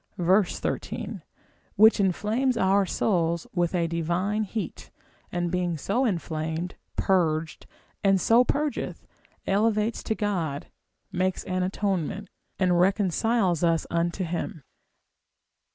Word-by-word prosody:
13, 185 +2 0 0.5
which 220 +1 +6
inflames 215 +7 +1
our 195 -1 +3
souls 170 -4 0
with 175 -1 0
a 170 -1 +2
divine 170 +6 -1
heat, 215 +1 -5 0.4
and 175 -1 -1
being 180 -2 -1
so 235 - 0
inflamed, 165 -3 -2 0.2
purged, 165 -4 0 0.4
and 195 -1 +4
so 230 +6 +5
purgeth, 290 +3 -2 0.4
elevates 215 +2 +1
to 220 - -2
God, 170 -10 -2 0.5
makes 185 +1 -1
an 185 0 -2
atonement, 195 0 -2 0.3
and 180 -2 +2
reconciles 190 0 +2
us 165 -2 +2
unto 170 +3 0
him. 165 -3 -4
185 Hz, 105 wpm, -26 LUFS, 170-210 Hz, 0.5 s, which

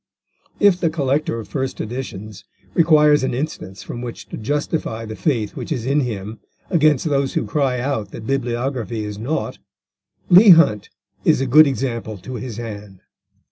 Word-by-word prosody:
If 200 -3 +4
the 165 - +1
collector 145 -5 -1
of 110 - -8
first 130 +6 -4
editions 110 -4 -6 0.3
requires 150 -3 +5
an 130 - -1
instance 125 - -5
from 120 - -7
which 120 -1 -7
to - - -6
justify 120 -2 -2
the 110 0 -7
faith 115 -9 -1
which - - -7
is 125 -7 -2
in 140 +3 +2
him 110 -4 -4 0.3
against 155 -5 +3
those 140 -3 0
who - - 0
cry 130 +2 0
out 120 -6 -2
that 110 - -9
bibliography 120 -3 -2
is 105 -1 -6
naught, 130 +8 -3 0.7
Leigh 185 +1 +9
Hunt 105 -11 +2 0.3
is - - +3
a 135 - 0
good 150 +4 +7
example 115 -5 -3
to 130 +7 -9
his 120 -4 -7
hand. 105 -4 -8
125 Hz, 165 wpm, -20 LUFS, 110-145 Hz, 0.7 s, Leigh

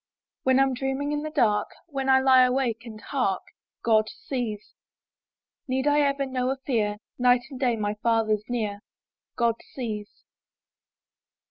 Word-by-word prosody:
When 260 0 +3
Tm 270 -1 +3
dreaming 270 +3 -2
in 295 0 -1
the 310 - -4
dark, 220 -9 +2 0.2
When 275 -4 -3
I 265 0 +6
lie 260 -1 +6
awake 250 -2 +1
and 215 -2 -9
hark, 215 -7 -1 0.4
God 215 -2 +3
sees. 230 -6 -5 0.9
Need 260 +1 0
I 295 0 +4
ever 280 -1 +1
know 255 -1 -1
a 270 - -1
fear? 210 -5 0 0.2
Night 245 0 +5
and 260 - -7
day 250 -3 +2
my 205 -1 -1
Father's 220 -2 +1
near: 215 -4 -2 0.3
— - - -67
God 235 -1 +2 0.2
sees. 215 -5 -4
250 Hz, 150 wpm, -26 LUFS, 220-270 Hz, 0.9 s, I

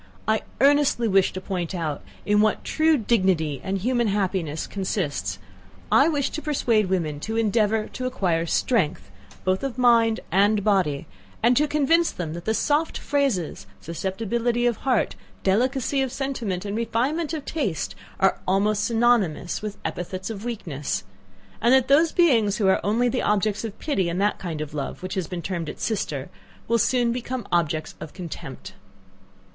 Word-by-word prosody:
I 220 0 +2 0.2
earnestly 280 -3 +4
wish 195 -2 +3
to 185 - -4
point 185 -2 -3
out 155 -4 -3 0.2
in 210 0 +4
what 215 0 +1
true 315 0 +3
dignity 185 - +1
and 195 +1 -1
human 240 +3 +1
happiness 185 -6 -1
consists 190 -6 -2 0.5
I - - +6
wish 290 -4 0
to 310 - -4
persuade 235 -10 +1
women 160 -6 -1
to 220 +8 -3
endeavour 220 -1 +2
to 255 -1 -4
acquire 170 -8 0
strength, 190 -5 0 0.3
both 185 0 +1
of 270 -2 -4
mind 230 -2 +4
and 200 +3 +3
body, 185 -9 +1 0.4
and 240 +2 +5
to 300 +4 +3
convince 305 +3 +3
them, 160 -3 -5
that 170 +1 -7
the 220 - +1
soft 300 +6 +1
phrases, 215 - -1
susceptibility 225 - -1
of 240 -2 +2
heart, 255 -5 0 0.3
delicacy 255 +7 +1
of 265 -2 -1
sentiment, 235 -9 -3
and 200 0 -3
refinement 260 +8 0
of 310 -4 -4
taste, 180 - -2 0.3
are 190 - +3
almost 205 +2 +2
synonymous 225 -8 +1
with 210 -1 -5
epithets 185 +3 -4
of 205 -1 -7
weakness, 150 - -3 0.6
and 235 - +4
that 260 0 +2
those 310 +4 +5
beings 230 - +3
who 205 - +2
are 190 - +3
only 230 +4 +2
the 250 +1 0
objects 210 0 +1
of 220 -3 -6
pity 195 - 0
and 170 +2 -2
that 205 +1 +1
kind 165 -4 -4
of 150 -1 -6
love, 145 +4 -5
which 185 +1 -4
has 185 -3 -2
been 175 -2 -5
termed 170 -4 -3
its - - -7
sister, 150 - -2 0.4
will 235 +1 +2
soon 240 +1 +2
become 245 -1 -4
objects 155 -2 0
of 155 - -8
contempt. 165 -7 -8
210 Hz, 165 wpm, -24 LUFS, 180-245 Hz, 0.6 s, I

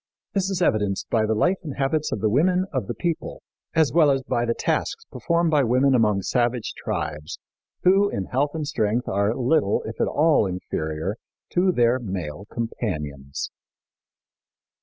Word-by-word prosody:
This 195 -1 0
is 185 -2 0
evidenced 100 - 0
by 110 -2 +2
the 110 - +1
life 180 - +2
and 150 -7 -6
habits 150 +3 0
of 100 - -2
the 110 - +2
women 180 - +3
of - - -1
the - - -3
people, 170 -3 -3 0.3
as 155 -6 +3
well 160 -3 +5
as 135 -1 +1
by 120 -1 0
the 115 0 0
tasks 455 - -1
performed 170 -1 +1
by 150 -3 +4
women 130 +3 +3
among 105 -5 +2
savage 120 +1 0
tribes, 75 0 -4 0.5
who 195 +2 +5
in 95 - -3
health 145 - -1
and 155 -2 -2
strength 120 -6 0
are 100 +3 +1
little, 130 -3 +2
if 110 - -5
at - - +2
all, 150 -8 +3
inferior 85 +1 -3 0.3
to 185 +1 +3
their 120 -4 +3
male 95 -5 -5
companions. 75 - -4
120 Hz, 165 wpm, -24 LUFS, 100-160 Hz, 0.5 s, well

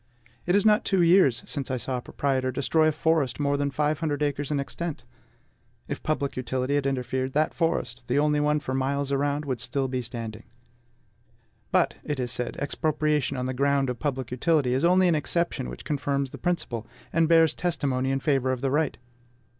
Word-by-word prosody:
It 175 - +3
is 205 - +3
not 210 0 +5
two 190 -3 +2
years 170 -8 +4
since 140 -3 -3
I 130 - -1
saw 125 +2 -3
a - - -4
proprietor 130 0 -1
destroy 155 +4 +2
a - - +4
forest 155 -5 +1
more 145 -1 +1
than 145 0 0
five 150 +2 0
hundred 150 -2 -1
acres 145 -1 -1
in 150 -2 0
extent. 160 +2 -4 0.8
If - - -4
public 145 -3 -1
utility 130 +1 -2
had 145 -1 +1
interfered, 130 0 -2
that 155 +1 +1
forest 125 -7 -1
the 125 - +1
only 150 0 +3
one 150 0 +2
for 130 - -4
miles 140 +1 -1
around 145 +2 0
would 130 -4 -3
still 135 +2 -1
be 130 -1 -2
standing. 115 -2 -6 1.3
But, - - +2
it 145 -2 -3
is 125 -1 -2
said, 125 -1 -3
expropriation 150 -1 0
on 125 - -2
the 130 - -2
ground 140 0 +1
of 125 - -7
public 130 -5 -3
utility 135 0 +2
is 130 +4 0
only 180 +2 +5
an 175 - +4
exception 160 - -1
which 60 - -9
confirms 140 -2 -1
the - - -9
principle, 120 -10 -2 0.3
and 165 -1 +3
bears 165 -1 +5
testimony 135 -7 -1
in 135 0 0
favor 135 -3 +1
of 130 -1 -3
the 135 -1 0
right. 150 +1 +1
140 Hz, 195 wpm, -26 LUFS, 130-155 Hz, 1.3 s, not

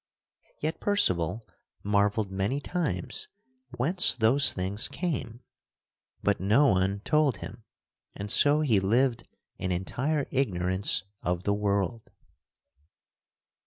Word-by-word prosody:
Yet 155 +2 -2
Percival 110 - 0 0.4
marvelled 105 0 +1
many 100 +8 -1
times 145 - -3 0.5
whence 170 +9 +2
those 125 +4 +3
things 95 +3 -1
came, 130 -9 -4 0.8
but - - +1
no 110 +10 +4
one 95 +1 +1
told 150 -2 +2
him - - -10 0.5
and 100 +1 -4
so 145 +1 +5
he 120 -10 +3
lived 120 +5 +1 0.3
in 95 0 -3
entire 135 - -1
ignorance 95 -7 0 0.2
of 90 0 -2
the 100 - +1
world. 100 +1 -1
105 Hz, 105 wpm, -28 LUFS, 95-140 Hz, 0.8 s, so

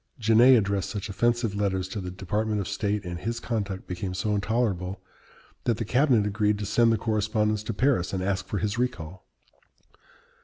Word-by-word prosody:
Genet 120 +2 +6
addressed 100 -2 0
such 105 -1 -5
offensive 120 +1 +1
letters 95 -2 -1
to 100 +2 -5
the 90 - -5
Department 105 +4 -2
of 95 - -3
State, 105 -2 -2
and 85 -1 -5
his 115 +5 -3
conduct 105 -6 -3
became 90 +1 -4
so 105 +3 -1
intolerable, 100 -3 -1 0.7
that 115 -3 +1
the 115 - -3
cabinet 125 -2 +3
agreed 105 0 +1
to 105 - -4
send 115 +3 +3
the 115 - +2
correspondence 110 0 0
to 105 - -4
Paris 120 -6 +1
and 95 -1 -2
ask 95 0 -1
for 105 - -3
his 105 +4 -2
recall. 95 -8 -3
105 Hz, 180 wpm, -26 LUFS, 95-115 Hz, 0.7 s, Genet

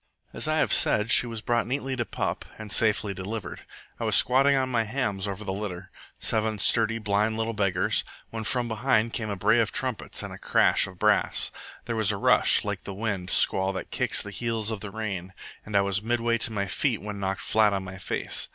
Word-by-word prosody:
"As - - -2
I - - +1
have - - +2
said, 105 +2 +4
she 125 - +6
was 115 -2 -6
brought 120 -2 0
neatly 135 +1 -3
to 120 -2 -2
pup, - - -3
and 110 -2 -8
safely 105 -2 +2
delivered. 95 +3 -6 0.4
I - - -4
was - - +2
squatting 135 +2 +5
on 130 -1 +1
my 120 -3 0
hams 105 -4 -2
over 100 +1 -5
the 95 -2 -4
litter 95 -3 -6 0.3
seven 110 0 0
sturdy, 115 +2 +2
blind 105 0 0
little 115 0 -2
beggars 100 -4 +1 0.3
when 110 -1 -5
from 120 +2 -1
behind 115 0 0
came 110 -2 -3
a 100 - -2
bray 110 +5 +2
of 115 - +1
trumpets 130 -4 -3
and - - -8
crash - - +3
of 95 -1 -12
brass. 105 +2 +2 0.3
There 115 - -3
was 110 -3 +2
a 100 - -3
rush, - - +4
like - - -4
the 100 - -7
wind 100 -4 -3
squall 95 +1 +4
that 95 - -7
kicks - - 0
the 105 - -8
heels 115 0 -1
of 110 - -4
the 105 - -7
rain, 95 -4 -5 0.3
and 105 -1 -1
I - - +5
was 100 0 -1
midway 115 +1 0
to 115 - 0
my 100 -2 -2
feet 115 +4 -1
when 105 -1 -7
knocked 95 0 -3
flat 110 -1 +3
on 100 -1 -2
my 95 +1 -9
face. - - -1
110 Hz, 215 wpm, -26 LUFS, 100-115 Hz, 0.4 s, she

